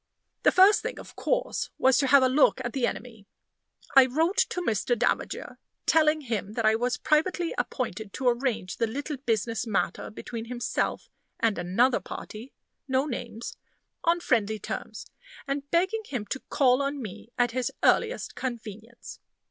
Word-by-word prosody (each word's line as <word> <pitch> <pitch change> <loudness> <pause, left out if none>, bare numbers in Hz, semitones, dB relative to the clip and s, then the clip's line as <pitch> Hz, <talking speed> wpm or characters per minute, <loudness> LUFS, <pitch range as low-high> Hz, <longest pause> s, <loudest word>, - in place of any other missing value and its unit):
The - - +5
first 385 +3 +6
thing, - - -4
of - - -12
course, - - -1
was 265 -1 +4
to 275 - +2
have 275 0 +6
a - - +5
look 265 +1 +4
at 240 - -3
the 255 -3 +1
enemy. 220 -5 -7 0.7
I 265 -1 +8
wrote 325 - +1
to 360 - -3
Mr. 235 - 0
Davager, 245 - -1 0.3
telling 310 -1 +4
him 220 -6 -3
that 230 -1 -1
I 215 - +5
was 245 +3 0
privately 335 +3 +1
appointed 225 -4 -3
to 260 - -2
arrange 240 -6 0
the 230 - +1
little 285 +5 -4
business 230 -2 -1
matter 210 - -1
between 225 +1 -7
himself 240 0 -2 0.3
and 225 -4 +1
"another 210 +9 +2
party" 225 +5 -8 0.4
(no 265 +1 +1
names!) 235 -4 -6 0.5
on 340 +1 +3
friendly 220 -7 +1
terms; - - -6 0.4
and 280 0 -3
begging 375 +7 +1
him 245 -7 -4
to 265 - -1
call 255 -1 +3
on 280 +1 -2
me 220 -2 -8
at 245 -1 +2
his 255 +1 -1
earliest 470 +2 +2
convenience. 230 -2 -7
250 Hz, 160 wpm, -27 LUFS, 225-285 Hz, 0.7 s, I